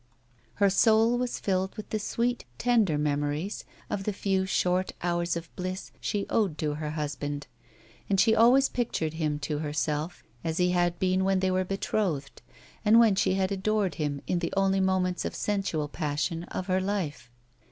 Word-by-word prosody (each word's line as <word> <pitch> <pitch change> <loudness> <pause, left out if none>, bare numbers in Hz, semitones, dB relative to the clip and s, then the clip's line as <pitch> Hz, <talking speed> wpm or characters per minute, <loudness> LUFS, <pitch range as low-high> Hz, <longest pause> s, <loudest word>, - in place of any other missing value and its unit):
Her 200 -1 +3
soul 225 +3 +4
was 250 -1 -2
filled 190 0 -1
with 215 - -8
the 215 - 0
sweet, 235 +4 -1
tender 225 -10 +2
memories 145 +5 -1 0.2
of 195 - -3
the 210 - -1
few, 190 -1 0
short 185 0 +1
hours 175 -1 0
of 170 0 -9
bliss 185 +1 -5
she 205 -1 -1
owed 195 -9 +1
to 150 -1 -1
her 150 0 -4
husband, 145 -1 -3 0.6
and 195 -1 +2
she 220 +2 +5
always 250 +4 +6
pictured 165 -10 -2
him 155 -2 -1
to 145 0 -2
herself 150 +2 -2 0.2
as 160 0 -2
he 180 0 +3
had 175 -1 +1
been 185 +1 +1
when 190 0 +2
they 190 0 +1
were 185 0 +1
betrothed, 185 -6 -2 0.4
and 220 +2 +6
when 225 -3 +6
she 190 -1 +2
had 190 0 0
adored 200 0 0
him 145 -2 -2
in 180 - 0
the 170 - -2
only 195 0 +3
moments 185 -1 +1
of - - -4
sensual 195 -7 -1
passion 160 +3 -2
of 185 - -5
her 185 0 +1
life. 185 - -3
185 Hz, 175 wpm, -28 LUFS, 155-200 Hz, 0.6 s, always